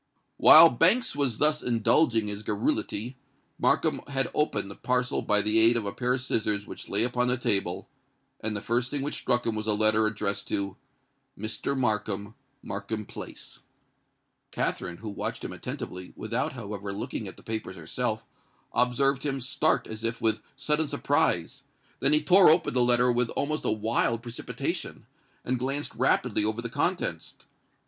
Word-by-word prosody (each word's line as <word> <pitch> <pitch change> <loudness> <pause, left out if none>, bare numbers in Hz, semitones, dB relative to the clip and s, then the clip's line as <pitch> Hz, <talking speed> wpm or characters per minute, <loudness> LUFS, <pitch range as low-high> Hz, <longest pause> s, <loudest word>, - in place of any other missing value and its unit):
While 165 +1 +9
Banks 180 - +3
was 135 -6 0
thus 150 0 +3
indulging 115 0 +2
his 105 0 -5
garrulity, 110 +3 -2 0.4
Markham - - +1
had 135 -2 -1
opened 105 -10 0
the - - -9
parcel 125 0 0
by 105 0 +2
the 105 +2 +3
aid 115 +1 +5
of 110 - -3
a 100 - -2
pair 125 +2 -1
of 130 - -4
scissors 105 -4 -1
which - - -9
lay 100 +3 +2
upon 125 0 0
the 125 +1 +2
table; 100 -7 0 0.5
and 110 0 -3
the 100 - -3
first 120 +2 0
thing 145 -1 -2
which 145 - -2
struck 120 0 0
him 115 - 0
was 110 0 -4
a 105 - +4
letter 110 +1 +3
addressed 100 -2 -2
to 100 -1 -2 0.6
"Mr. 110 +6 -3
Markham, 105 -4 -1 0.3
Markham 105 +2 -5
Place." - - -10 0.9
Katherine, 85 -1 -3
who 110 +2 -7
watched - - -4
him - - -5
attentively, 90 0 -7
without, 115 +5 -2
however, 100 -4 -6
looking 100 - -5
at - - -10
the - - -16
papers 110 -4 -5
herself, 110 +7 -3 0.5
observed 125 +3 +2
him 135 -2 -2
start 140 +5 +1
as 110 0 -8
if 115 0 -2
with 110 -1 0
sudden 150 +1 0
surprise: 145 - 0 0.4
then 135 - +2
he 150 0 +3
tore 180 +3 +7
open 160 +2 +3
the 125 - +3
letter 125 0 +4
with 120 -1 +1
almost 155 +2 -1
a - - +2
wild 115 +1 0
precipitation, 120 -1 -5 0.4
and 125 0 -1
glanced 135 +3 -3
rapidly 125 -3 +1
over 110 +1 -1
the 115 - -4
contents. - - -2
115 Hz, 170 wpm, -27 LUFS, 105-130 Hz, 0.9 s, While